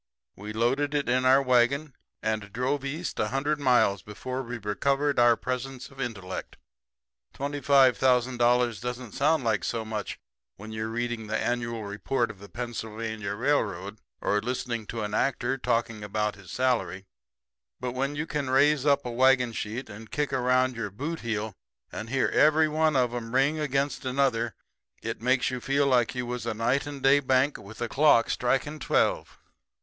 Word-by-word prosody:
We 105 +2 -7
loaded 135 +7 0
it 145 - 0
in 130 +1 +2
our 135 +2 +6
wagon 130 +3 +2 0.3
and 110 -2 -2
drove 130 +5 -1
east 155 +6 -4
a 105 - +1
hundred 140 +5 -1
miles 125 -7 +3
before 130 +5 -5
we 125 -1 -5
recovered 140 +7 0
our 120 -1 +6
presence 125 +2 -4
of 135 0 -9
intellect. 95 -7 -5 0.8
Twenty 145 +1 -4
five 135 -5 +5
thousand 125 -1 +2
dollars 120 -3 +2
doesn't 125 -1 -5
sound 150 +3 +2
like 110 -6 +1
so 115 +2 -2
much 110 -1 -4 0.4
when 110 +2 -10
you're 110 0 -3
reading 120 -1 -3
the 110 +1 -1
annual 115 -2 -2
report 115 +4 -1
of 100 - -16
the 100 0 -12
Pennsylvania 110 -1 -4
Railroad 105 -6 -1 0.2
or 105 0 +1
listening 120 -2 -3
to 115 -2 -4
an 105 0 -4
actor 130 +1 0
talking 115 -4 -1
about 105 +1 -1
his 100 -3 -15
salary; 120 -4 0 0.7
but 125 - -3
when 135 +3 -2
you 150 +1 -2
can 145 -4 -3
raise 145 +2 +3
up 140 -1 +3
a 120 - -3
wagon 125 -1 +3
sheet 115 +4 -4
and 105 +2 -11
kick 145 +1 -2
around 130 0 +2
your 115 -3 -3
bootheel 115 - -3 0.4
and 110 - -6
hear 135 0 +2
every 155 +1 +4
one 155 0 +1
of 125 -2 +2
'em 120 0 -5
ring 140 +4 +3
against 140 -1 -1
another 130 -3 0 0.5
it 115 0 -4
makes 125 +1 +2
you 130 -1 -4
feel 140 +2 +1
like 125 -3 +2
you 125 -1 -2
was 120 -1 -4
a 110 - -1
night 125 +6 0
and 140 -2 -7
day 135 +1 +6
bank 130 +1 +2
with 105 +3 -12
the 120 - -2
clock 135 -3 +4
striking 135 +5 0
twelve. - - 0
125 Hz, 175 wpm, -27 LUFS, 110-135 Hz, 0.8 s, our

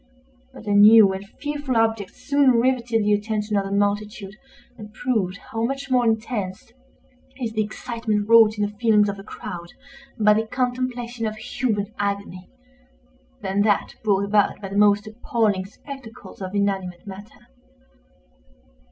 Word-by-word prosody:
But - - -13
a 205 - -2
new 205 -1 +8
and 195 +1 -7
fearful 290 -4 -2
object 225 -3 0
soon 280 -2 +3
rivetted 235 -2 +1
the 210 - +3
attention 210 0 -1
of 200 -1 +1
the 195 - -5
multitude, 205 0 -1 0.4
and 210 -3 -11
proved 215 -5 -1
how 225 +2 -5
much 275 +2 -3
more 250 -1 +3
intense 220 -3 -2 0.7
is 230 -3 -3
the 215 - +1
excitement 215 -1 -3
wrought 225 -1 +6
in 210 - 0
the 205 0 -6
feelings 215 -3 +4
of 200 0 -5
a - - -9
crowd 175 -4 -8 0.5
by 210 -2 +5
the 220 +1 0
contemplation 245 -1 -2
of 215 - -4
human 215 -2 -2
agony, 200 -2 -3 0.9
than 195 +1 0
that 205 -1 +1
brought 200 -2 +2
about 205 0 +2
by 195 -2 -7
the 195 - -6
most 205 0 +4
appalling 215 -3 -1
spectacles 230 +1 -11
of 190 +1 -5
inanimate 190 -3 -2
matter. 200 - -12
215 Hz, 150 wpm, -23 LUFS, 200-230 Hz, 0.9 s, new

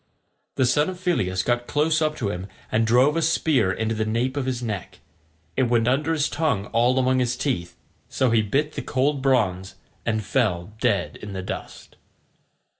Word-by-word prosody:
The 130 - +2
son 150 +6 +2
of 185 - -6
Phyleus 95 - 0
got 120 0 0
close 155 +2 +1
up 155 -1 +1
to 115 -9 -2
him 90 +1 -5 0.2
and 115 +1 +2
drove 130 +6 +4
a 165 - +1
spear 155 - +2
into 110 +4 -1
the 110 0 -1
nape 115 +5 -1
of 140 -2 -2
his 125 -2 -2
neck: 105 -5 -5 0.6
it 130 -3 +1
went 120 -1 +2
under 145 +5 +1
his 155 -2 +1
tongue 140 -11 0
all 120 +3 +3
among 130 0 +2
his 125 -1 0
teeth, 125 -11 -2 0.3
so 130 -3 +1
he 115 -1 +4
bit 140 +9 0
the - - -4
cold 140 +2 0
bronze, 100 -9 +1 0.3
and 110 -1 -1
fell 100 -5 0
dead 105 -7 0
in 105 -1 -8
the 95 -1 -4
dust. - - -8
125 Hz, 190 wpm, -24 LUFS, 110-140 Hz, 0.6 s, drove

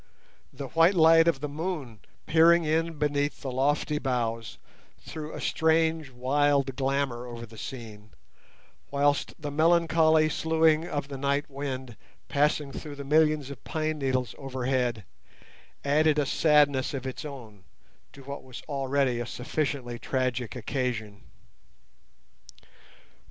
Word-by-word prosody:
The - - -7
white 165 +4 +4
light 165 0 +6
of 150 -5 +2
the 150 - -2
moon 145 - -5 0.3
peering 165 +1 +5
in 165 +1 0
beneath 145 -1 -1
the 135 - -4
lofty 145 +3 0
boughs 115 -4 -2 0.4
threw 155 -1 -8
a - - -7
strange 160 -1 +1
wild 135 +1 +1
glamour 135 -2 -1
over 120 -1 -7
the 115 0 -15
scene, 110 -5 -8 0.8
whilst 145 0 0
the 150 -2 -5
melancholy 160 0 +4
soughing 160 +1 +2
of 145 -5 -3
the 140 -2 -7
night 140 +1 0
wind 130 -4 -5 0.3
passing 145 0 +1
through 145 +1 -7
the 140 - -7
millions 150 -1 +2
of 135 - -10
pine 155 -1 -2
needles 130 -3 -1
overhead 125 -4 -1 0.8
added 150 +2 +3
a 145 - +2
sadness 145 -2 +3
of 135 -1 -5
its 130 - -5
own 120 -10 -10 0.5
to 140 - -14
what 140 +1 -7
was 130 -2 -10
already 135 -3 0
a 120 - -4
sufficiently 125 -2 -3
tragic 125 -4 -2
occasion. 110 -4 -3
140 Hz, 130 wpm, -27 LUFS, 130-155 Hz, 0.8 s, light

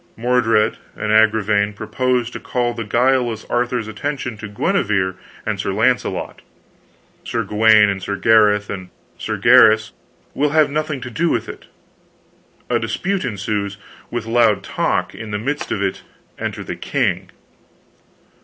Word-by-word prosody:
Mordred 115 -2 +2 0.2
and 105 - -2
Agravaine 110 -1 +3
propose 125 +3 -1
to - - -7
call 120 -1 -1
the 115 -1 -4
guileless 120 0 +1
Arthur's 120 -2 0
attention 125 +3 -4
to 110 - -7
Guenever 100 -2 0 0.3
and 110 -3 -2
Sir 95 - -2
Launcelot. 125 +5 0 0.8
Sir - - -2
Gawaine, 105 -2 +4
Sir 100 +2 -3
Gareth, 105 0 +4
and 95 -2 -6 0.3
Sir - - -3
Gaheris 110 -1 +5 0.4
will 145 +2 +1
have 150 -1 +3
nothing 155 -2 -2
to 125 0 -7
do 170 +6 0
with - - -1
it. - - -10 1.0
A - - +1
dispute 195 0 -2
ensues, 100 -3 -3 0.3
with 120 -2 -4
loud 115 -2 +2
talk; - - -1
in 110 -1 -8
the 105 - -2
midst 140 +7 -3
of 100 - -1
it 95 - -2 0.4
enter - - -4
the - - -5
king. - - -1
110 Hz, 140 wpm, -19 LUFS, 105-125 Hz, 1.0 s, Gaheris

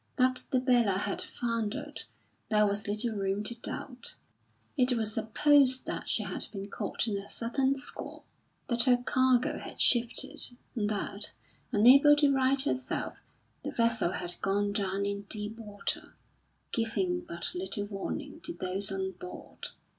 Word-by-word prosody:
That 255 -1 +2
the 255 - +2
Bella 240 -6 +3
had 200 0 -1
foundered 235 +5 -3 0.4
there 210 -1 +4
was 205 0 -1
little 215 +3 +1
room 195 0 -1
to 225 - -3
doubt. 245 +1 -6 0.6
It 255 -3 +3
was 220 -2 0
supposed 260 +4 +4
that - - -4
she - - +1
had - - -4
been 200 -1 -7
caught - - -2
in 205 -2 0
a 200 - -10
sudden 265 +4 +1
squall, 275 +1 -8 0.4
that 235 -1 +2
her 250 -2 +5
cargo 255 0 +2
had - - -8
shifted, 240 0 +2 0.2
and 210 -3 0
that, 205 0 -1 0.4
unable 270 +7 +7
to 290 -1 +4
right 270 +1 +3
herself, 265 -2 -1 0.5
the - - -3
vessel 230 -6 +1
had 175 0 -5
gone 200 +1 +1
down 200 -1 0
in 200 0 -3
deep 215 +1 -4
water, 205 -2 -3 0.6
giving 350 +11 0
but 170 - -4
little 190 +3 -3
warning 280 - -5
to 340 - -5
those 195 - +1
on 190 0 -2
board. 180 0 -8
225 Hz, 150 wpm, -30 LUFS, 200-255 Hz, 0.6 s, unable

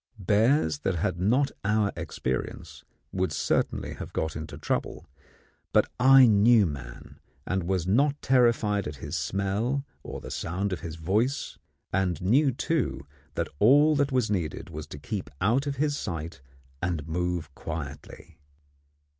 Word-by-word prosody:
Bears 105 - +2
that 95 +4 -1
had 90 0 -1
not 125 +9 +2
our 105 0 +2
experience 65 0 -4 0.3
would 95 -3 -1
certainly - - -1
have - - -8
got 80 -1 -2
into 80 -1 -6
trouble; - - -3 0.7
but - - +3
I 135 +1 +8
knew 110 0 +5
man, 65 -6 -8 0.3
and 95 -1 -1
was 95 -3 0
not 140 +9 +2
terrified 115 - +2
at 75 - -6
his 70 +4 -6
smell 100 - -1 0.2
or - - -7
the - - -9
sound 95 +4 -2
of 90 - -3
his 80 +1 -6
voice, 105 - -1 0.3
and 90 -3 +1
knew, 130 +10 +3
too, 120 - -1 0.3
that - - -1
all 145 +7 +6
that 145 -1 +1
was 125 -5 +1
needed 85 -7 -3
was 75 0 -7
to 75 - -9
keep 95 +1 -5
out 120 +9 +2
of 140 - -1
his 145 +1 0
sight 85 - -5 0.4
and 85 -4 -2
move 85 -2 -2
quietly. 75 -3 -8
95 Hz, 145 wpm, -27 LUFS, 80-125 Hz, 0.7 s, I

